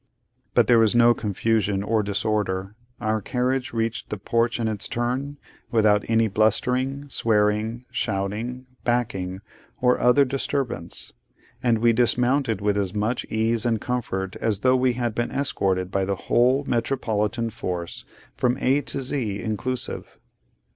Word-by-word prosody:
But - - +5
there 120 -2 +5
was 110 0 +4
no 120 0 +6
confusion 105 -2 0
or 110 +1 +1
disorder. 100 -1 -1 0.3
Our 110 -1 0
carriage 125 +4 -1
reached 115 0 -2
the 105 - -3
porch 115 +4 0
in 115 - 0
its 110 -2 -2
turn, 130 +4 -2 0.3
without 105 -3 +3
any 115 0 +3
blustering, 125 +7 0
swearing, 110 0 +1
shouting, 115 +1 -2 0.2
backing, 100 -6 -1 0.4
or 125 0 +3
other 130 +3 +5
disturbance: 130 -8 -3 0.5
and 120 -2 +3
we 115 +1 +3
dismounted 120 -1 +2
with 105 0 +1
as 95 0 -2
much 110 +4 -1
ease 110 +1 0
and 115 -3 +1
comfort 95 -7 -3
as 105 -3 -1
though 130 0 +4
we 130 -1 +2
had 120 -2 -2
been 120 +2 -1
escorted 95 -9 -1
by 95 0 +1
the 100 +1 -1
whole 125 +8 +2
Metropolitan 115 -2 -1
Force 90 -4 -5 0.3
from 125 0 +1
A 135 +3 +2
to 140 - -3
Z 120 -7 -2
inclusive. 120 +4 -4
115 Hz, 140 wpm, -24 LUFS, 105-125 Hz, 0.5 s, no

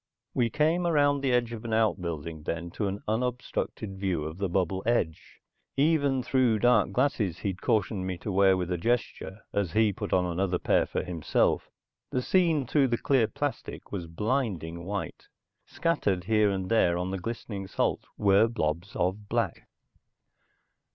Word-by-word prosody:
We 120 -2 +2
came 160 +5 +1
around 145 -3 +3
the 135 -2 +1
edge 120 -1 +1
of 115 -1 -7
an 115 -1 -3
outbuilding 85 -8 -1
then 85 +2 -4
to 105 - -2
an 100 +1 -4
unobstructed 110 -3 -2
view 95 -5 -1
of 80 +4 -6
the 100 -2 -1
bubble 95 +1 0
edge. 105 -9 -1 0.4
Even 140 -3 +2
through 125 -3 +2
dark 120 +3 +3
glasses 125 - 0
he'd 95 -1 -4
cautioned 100 -3 0
me 95 -1 -3
to 100 - -5
wear 95 0 +4
with 90 -1 -3
a 90 - -1
gesture, 110 -1 -2
as 100 -5 -1
he 110 -1 +3
put - - -5
on 90 -1 +3
another 90 +1 0
pair - - +2
for - - -2
himself, 85 -4 0 0.4
the 125 - -1
scene 165 -6 +2
through 140 +2 +3
the 120 -1 0
clear 130 -4 +2
plastic - - -5
was 90 -4 -4
blinding 85 - -2
white. 100 +1 -5 0.4
Scattered 100 - 0
here 105 +1 +3
and 95 -2 -2
there 85 -6 +3
on 90 +1 -2
the 95 - -3
glistening 100 -1 -5
salt - - -1
were 100 +2 +5
blobs 90 -4 -2
of 100 +3 -1
black. - - -1
100 Hz, 165 wpm, -28 LUFS, 90-120 Hz, 0.4 s, were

